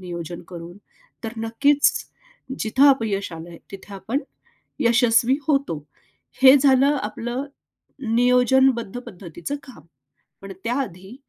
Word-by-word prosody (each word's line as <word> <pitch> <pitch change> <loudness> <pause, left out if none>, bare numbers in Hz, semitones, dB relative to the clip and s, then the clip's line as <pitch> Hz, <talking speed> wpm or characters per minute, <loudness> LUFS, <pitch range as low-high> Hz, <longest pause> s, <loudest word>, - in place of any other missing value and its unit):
नियोजन 175 -2 -7
करून, 175 0 -9 0.5
तर 225 - -4
नक्कीच 275 +6 +2 0.7
जिथं 265 +6 +4
अपयश 210 -8 -1
आलंय 165 +1 -9
तिथे 195 +1 -10
आपण 215 +7 -3 0.6
यशस्वी 240 0 +3
होतो. 275 - 0 0.6
हे 265 +1 +9
झालं 270 -1 +4 0.2
आपलं 240 +5 -4 0.7
नियोजनबद्ध 250 -1 +3
पद्धतीचं 180 - -7
काम. 260 -3 -14 0.6
पण 195 0 -9
त्या 235 +1 -1
आधी 190 0 -8
230 Hz, 105 wpm, -22 LUFS, 190-265 Hz, 0.7 s, हे